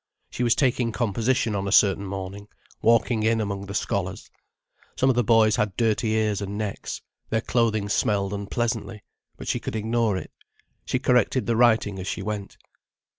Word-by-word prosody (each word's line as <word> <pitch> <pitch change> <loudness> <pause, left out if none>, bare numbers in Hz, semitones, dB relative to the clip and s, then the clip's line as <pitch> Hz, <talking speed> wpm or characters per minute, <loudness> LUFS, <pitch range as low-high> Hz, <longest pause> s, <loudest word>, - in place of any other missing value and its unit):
She - - -5
was 120 -2 +3
taking 125 -3 +1
composition 115 +1 0
on 100 0 -2
a - - -2
certain 100 -1 +4
morning, 100 +1 -6 0.3
walking 115 0 +3
in 115 +1 +2
among 100 -2 -3
the 100 - -6
scholars. - - -3 0.6
Some 130 +1 +3
of - - -2
the 120 - +2
boys 110 -1 +4
had 105 -3 -1
dirty 110 -1 +1
ears 110 -2 0
and 100 +1 -4
necks, 105 -2 -4 0.3
their 110 - +1
clothing 110 -4 +1
smelled 105 -2 0
unpleasantly, 105 +1 -3 0.3
but - - -9
she - - 0
could - - -5
ignore 110 -1 0
it. - - -7 0.5
She - - 0
corrected 125 0 +2
the 115 - +1
writing 110 -4 +3
as 95 - -6
she 95 - -3
went. 105 -1 -5
110 Hz, 175 wpm, -25 LUFS, 100-115 Hz, 0.6 s, certain